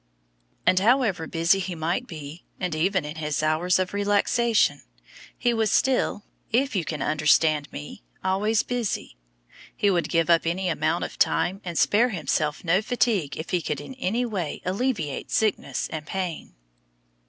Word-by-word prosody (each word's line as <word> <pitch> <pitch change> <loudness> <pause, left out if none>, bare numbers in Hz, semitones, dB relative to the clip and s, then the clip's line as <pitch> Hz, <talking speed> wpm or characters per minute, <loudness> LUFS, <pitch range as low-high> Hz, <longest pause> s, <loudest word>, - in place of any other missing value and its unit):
And 185 - +4
however 215 -6 +2
busy 165 +4 +2
he 185 -2 -4
might 170 +10 -2
be, 155 -1 -9 0.2
and 180 -3 -2
even 175 +2 +1
in 150 +2 -6
his 150 -1 -2
hours 160 +4 +2
of 185 0 -2
relaxation, 205 - +2 0.6
he 240 - +1
was 220 -2 +1
still, 255 -3 +1 0.3
if 260 +1 +1
you 185 - +1
can 155 -3 -3
understand 150 0 +2
me, 75 -3 -8 0.2
always 205 +4 +1
busy; 240 - -3 0.6
he 205 - +2
would 175 -3 0
give 165 -1 +2
up 170 -1 +3
any 180 +2 0
amount 165 0 0
of - - -7
time 190 +3 +1
and 170 -3 -5
spare 235 +4 +4
himself 155 - -1
no 180 +3 +3
fatigue 215 - 0
if 160 - -6
he 180 -2 +1
could 150 - -3
in 145 - -8
any 245 0 -1
way 190 -10 -3
alleviate 185 - -2
sickness 215 -2 0
and 155 -1 -5
pain. 180 - -4
180 Hz, 160 wpm, -25 LUFS, 155-210 Hz, 0.6 s, And